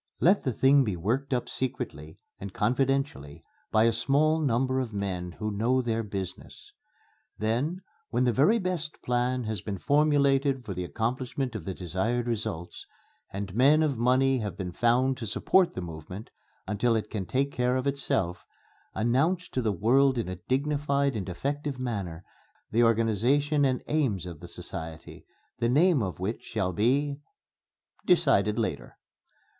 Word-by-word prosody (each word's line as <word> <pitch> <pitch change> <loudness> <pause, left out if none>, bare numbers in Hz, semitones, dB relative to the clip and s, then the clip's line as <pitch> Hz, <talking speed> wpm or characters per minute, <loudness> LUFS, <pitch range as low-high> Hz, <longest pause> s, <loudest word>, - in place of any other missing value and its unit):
Let 190 +5 +4
the 130 - 0
thing 135 +4 +4
be 105 -6 -2
worked 120 +12 -1
up 125 -2 0
secretly 80 - -4 0.2
and 100 0 -6
confidentially 125 - -1 0.3
by 110 - +4
a 115 0 +4
small 145 +7 +2
number 130 -1 +1
of 120 -4 -3
men 90 -3 -3
who 105 +2 -4
know 120 +5 +2
their 115 -2 0
business. 100 - -7 0.6
Then 135 - -1 0.3
when 125 +1 +1
the 125 -1 +2
very 175 - +4
best 180 -6 -3
plan 125 +1 0
has 110 -4 -3
been 100 0 -4
formulated 140 -1 +2
for 100 - -4
the 90 0 -4
accomplishment 125 +5 -2
of 105 -7 -6
the 95 - -4
desired 105 +7 -1
results, 100 -8 -4 0.4
and 100 -1 -5
men 140 +7 +5
of 145 -3 +1
money 130 +3 +3
have 105 -6 -4
been 90 -2 -4
found 125 +6 +2
to 115 - -5
support 185 - +2
the 95 - -3
movement 85 +5 -8 0.4
until 110 +3 +1
it 105 -1 -3
can 95 -4 -3
take 140 +2 0
care 125 0 0
of 130 - -2
itself, 100 -11 0 0.5
announce 140 +11 +1
to 130 - -2
the 110 -3 +1
world 130 +7 +3
in 115 - -1
a 90 -1 -5
dignified 140 0 +1
and 100 -3 -4
effective 140 +9 -3
manner 100 -10 -4 0.5
the 115 - +3
organization 120 +7 +2
and 130 -2 0
aims 130 - 0
of 85 -4 -8
the 85 - -10
society, 80 -2 -8 0.3
the 115 0 +1
name 155 +2 +4
of 95 -4 -3
which 100 +5 -3
shall 95 -5 -2
be, 140 - +1 0.9
decided 135 - +3
later.... 115 - -3
120 Hz, 160 wpm, -28 LUFS, 100-140 Hz, 0.9 s, men